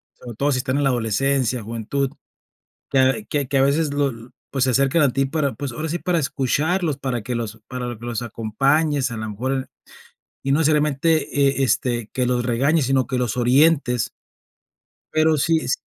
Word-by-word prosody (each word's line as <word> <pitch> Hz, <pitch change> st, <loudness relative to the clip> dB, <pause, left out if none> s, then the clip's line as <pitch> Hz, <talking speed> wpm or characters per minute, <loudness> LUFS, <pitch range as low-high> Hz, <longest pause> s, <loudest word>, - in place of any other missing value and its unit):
sobre 120 Hz, -2 st, -10 dB
todo 145 Hz, +1 st, +1 dB
si -, -, 0 dB
están 130 Hz, +2 st, -1 dB
en 145 Hz, -, +1 dB
la -, -, +4 dB
adolescencia, 125 Hz, +1 st, 0 dB
juventud, 115 Hz, +5 st, -2 dB, 0.8 s
que 135 Hz, -, 0 dB
a 130 Hz, +10 st, +3 dB
que 145 Hz, -8 st, -2 dB
que 135 Hz, -, 0 dB
a 135 Hz, -, +4 dB
veces 145 Hz, +2 st, +2 dB
lo 145 Hz, -1 st, +1 dB
n 115 Hz, 0 st, -10 dB, 0.2 s
pues, 135 Hz, -1 st, +1 dB
se 130 Hz, -, +2 dB
acercan 135 Hz, +5 st, +3 dB
a 135 Hz, -, +2 dB
ti 135 Hz, 0 st, +1 dB
para, 140 Hz, -2 st, -1 dB
pues, 135 Hz, +2 st, -5 dB
ahora 155 Hz, +6 st, -4 dB
sí 175 Hz, +3 st, -2 dB
para 175 Hz, -2 st, 0 dB
escucharlos, 150 Hz, +4 st, 0 dB
para 130 Hz, -4 st, -3 dB
que 120 Hz, +2 st, -3 dB
los 115 Hz, -1 st, -4 dB
para 125 Hz, -2 st, -4 dB
que 120 Hz, -, -10 dB
los 120 Hz, -1 st, -3 dB
acompañes, 135 Hz, +6 st, +1 dB
a -, -, -4 dB
la 110 Hz, 0 st, -4 dB
mejor 125 Hz, +6 st, -2 dB
en 130 Hz, -1 st, -3 dB, 0.8 s
y 135 Hz, -, +2 dB
no 160 Hz, +3 st, +3 dB
solamente, 150 Hz, +1 st, +2 dB, 0.3 s
eh, 135 Hz, 0 st, 0 dB
este, 120 Hz, -3 st, 0 dB
que 125 Hz, -1 st, 0 dB
los 120 Hz, 0 st, 0 dB
regañes, 140 Hz, +6 st, +2 dB
sino 135 Hz, -1 st, +2 dB
que 130 Hz, -, -2 dB
los 125 Hz, -1 st, -1 dB
orientes. 125 Hz, 0 st, +3 dB, 1.0 s
Pero 155 Hz, 0 st, +3 dB
sí 160 Hz, +3 st, +2 dB
es -, -, 0 dB
135 Hz, 200 wpm, -22 LUFS, 120-145 Hz, 1.0 s, la